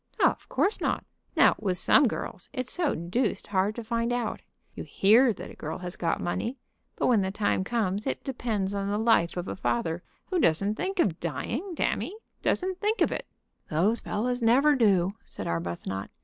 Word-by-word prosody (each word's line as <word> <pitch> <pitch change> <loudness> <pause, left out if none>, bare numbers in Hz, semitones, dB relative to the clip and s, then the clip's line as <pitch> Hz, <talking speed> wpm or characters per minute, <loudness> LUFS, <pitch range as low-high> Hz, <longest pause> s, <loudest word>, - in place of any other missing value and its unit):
"Of - - 0
course 435 -4 +1
not." - - -1 0.3
"Now, - - +7
with 190 -4 0
some 265 +9 +6
girls 180 - -5
it's 255 0 -3
so 345 -4 0
deuced 190 +6 -1
hard 200 +1 0
to 235 - -5
find 230 +1 -1
out. 245 -3 -2 0.3
You - - -6
hear 230 +6 +5
that 205 - -7
a - - -12
girl 155 +1 -5
has 180 -1 -6
got 165 -1 -1
money, 230 +9 -2 0.4
but - - -1
when 230 -5 +4
the 190 - 0
time 200 -1 0
comes 210 0 -1
it - - -2
depends 220 -7 -2
on 200 0 -2
the 205 - 0
life 215 -7 +3
of 175 - -3
a - - -3
father 160 +5 -1 0.3
who 365 - +2
doesn't 195 - +2
think 385 - -3
of 185 - +2
dying; 225 - -3
damme, 395 +5 -1 0.2
doesn't 370 0 0
think 425 +2 +1
of - - +3
it." - - -4 0.4
"Those 195 +9 +2
fellows 245 +4 -2
never 270 +6 +5
do," 195 -7 +3
said - - -7
Arbuthnot. 85 +3 -3
210 Hz, 190 wpm, -28 LUFS, 180-250 Hz, 0.4 s, Now